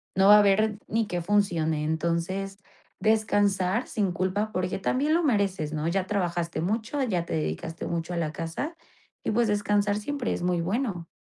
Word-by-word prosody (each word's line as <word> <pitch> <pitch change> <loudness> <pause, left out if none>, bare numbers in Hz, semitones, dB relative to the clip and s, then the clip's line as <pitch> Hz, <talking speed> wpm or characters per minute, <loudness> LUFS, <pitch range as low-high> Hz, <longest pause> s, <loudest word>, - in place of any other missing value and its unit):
no 190 +1 +4
va 210 - +10
a - - +7
haber 210 +1 +3
ni 225 -1 0
que 175 -1 -2
funcione, 165 -6 +1
entonces, 170 +5 -1 0.4
descansar 205 -1 +2
sin 200 -4 0
culpa 190 +5 -1
porque 185 0 -1
también 275 +10 +1
lo 340 +1 +3
mereces 195 - 0
¿no?, 155 +1 -2
ya 190 +1 0
trabajaste 175 -5 -1
mucho, 220 - -1
ya 180 -8 -1
te - - -5
dedicaste 80 - -3
mucho 170 +1 -3
a 175 - -2
la 155 -2 -1
casa 165 - -4 0.5
y, - - -1
pues, 235 +1 +2
descansar 205 0 +1
siempre 250 +3 -2
es - - -4
muy 180 -1 +1
bueno. 190 -3 -2
195 Hz, 175 wpm, -27 LUFS, 170-210 Hz, 0.5 s, va